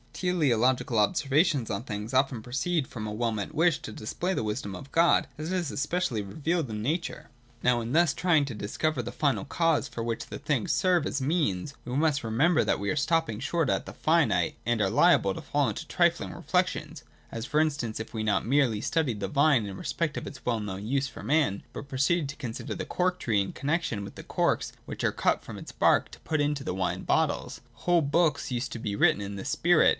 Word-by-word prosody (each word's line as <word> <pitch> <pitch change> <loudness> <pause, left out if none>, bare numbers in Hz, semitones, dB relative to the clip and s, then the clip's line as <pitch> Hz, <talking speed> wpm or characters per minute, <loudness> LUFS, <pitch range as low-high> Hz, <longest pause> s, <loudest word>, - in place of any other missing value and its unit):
Teleological 130 - +1
observations 145 - +2
on 100 +3 -2
things 105 0 -5
often 130 -3 +1
proceed 135 +4 -1
from 110 -2 -6
a - - -4
well 115 +2 -1
meant 105 -3 -4
wish 165 -1 +3
to - - -7
display 175 - -3
the - - -1
wisdom 105 -2 -3
of 135 +9 -10
God 165 -2 +4
as 155 +3 -5
it - - 0
is 175 -6 -1
especially 145 - -1
revealed 150 - -2
in 105 -1 -4
nature. 160 +9 -3 0.3
Now 125 -1 +3
in 115 +1 -4
thus 165 -2 +4
trying 160 -5 +3
to 130 -5 -6
dis 105 +1 -6
cover 155 -5 +1
final 140 +5 -1
causes 165 0 +1
for 115 - -5
which 115 0 -3
the - - -6
things 140 -7 -1
serve 180 -4 +2
as 140 - -2
means, 140 - 0
we 125 +1 -4
must 145 -2 +2
remember 140 +10 +3
that - - +1
we 100 0 -1
are - - -1
stopping 150 -6 +1
short 160 +3 0
at 95 - 0
the - - -7
finite, - - +2
and 120 0 0
are 100 -2 +2
liable - - +4
to - - -7
fall - - +1
into - - -5
trifling - - +1
reflections: - - -1 0.3
as, 115 +2 -5
for 150 - +1
instance, 140 -9 0
if 110 - -7
we 110 - -2
not 105 -3 +1
merely 125 -4 +2
studied 130 -10 0
the 95 - -1
vine 140 -1 +3
in 100 -1 -6
respect 155 - -2
of - - -5
its 130 -4 -10
well 120 -2 +1
known 100 -1 -5
use 135 +4 0
for - - -10
man, 145 -10 +1
but 140 - -7
proceeded 140 +3 +1
to 145 - -6
consider 120 -7 -5
the - - -4
cork 180 0 0
tree 105 -4 +1
in 95 - -4
con 140 - -4
nexion 155 -11 -1
with 100 - -8
the - - -10
corks - - 0
which - - -6
are - - +3
cut - - +1
from - - -8
its - - -9
bark - - +3
to - - -12
put 155 -2 -1
into 145 -1 0
the 90 - -3
wine 90 -1 -1
bottles. - - 0 0.2
Whole 175 -1 +4
books 145 -1 +1
used 120 +1 -2
to 115 - -5
be 105 -2 -3
written 100 - +3
in 100 0 -5
this 100 - -5
spirit. 175 -1 +4
135 Hz, 225 wpm, -28 LUFS, 110-155 Hz, 0.3 s, God